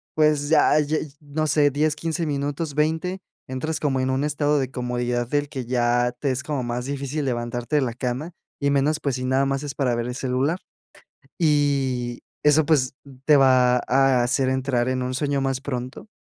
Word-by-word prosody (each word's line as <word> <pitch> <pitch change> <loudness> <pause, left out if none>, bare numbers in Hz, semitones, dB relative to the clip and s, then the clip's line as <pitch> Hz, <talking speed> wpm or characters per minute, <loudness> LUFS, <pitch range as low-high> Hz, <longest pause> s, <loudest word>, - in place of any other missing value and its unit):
pues, 150 -1 +2
ya 155 -1 +5
ya, 150 +2 0 0.2
no 150 +1 -2
sé, 145 -1 +3
10, 150 +2 +1
15 165 +2 -2
minutos, 145 +1 -2
20, 160 +5 0 0.3
entras 150 +4 -3
como 135 -3 0
en 130 - 0
un 130 +2 0
estado 150 0 +1
de 130 -1 -2
comodidad 125 -1 -2
del 145 +2 0
que 130 -3 -5
ya 120 0 +1
te 140 -3 0
es 130 0 -3
como 145 -4 -2
más 120 0 -3
difícil 140 +2 -3
levantarte 120 +2 -2
de 145 - +3
la 120 -3 -2
cama, 125 +7 -4 0.3
y 140 - +2
menos, 145 +3 +2
pues, 140 -3 -1
si 125 - -4
nada 130 +1 +2
más 135 +1 -1
es 145 -1 -4
para 125 -4 +1
ver 120 0 -2
el 125 - -4
celular. 135 +6 -1 0.8
Y 140 -6 +1 0.2
eso, 150 +1 +4
pues, 135 -4 +2 0.3
te 150 - +6
va 130 -2 +5
a 135 -1 +3
hacer 130 +2 +1
entrar 130 -2 0
en 130 0 -1
un 125 0 -3
sueño 140 0 0
más 135 -1 -1
pronto. 130 - -5
135 Hz, 195 wpm, -23 LUFS, 125-150 Hz, 0.8 s, te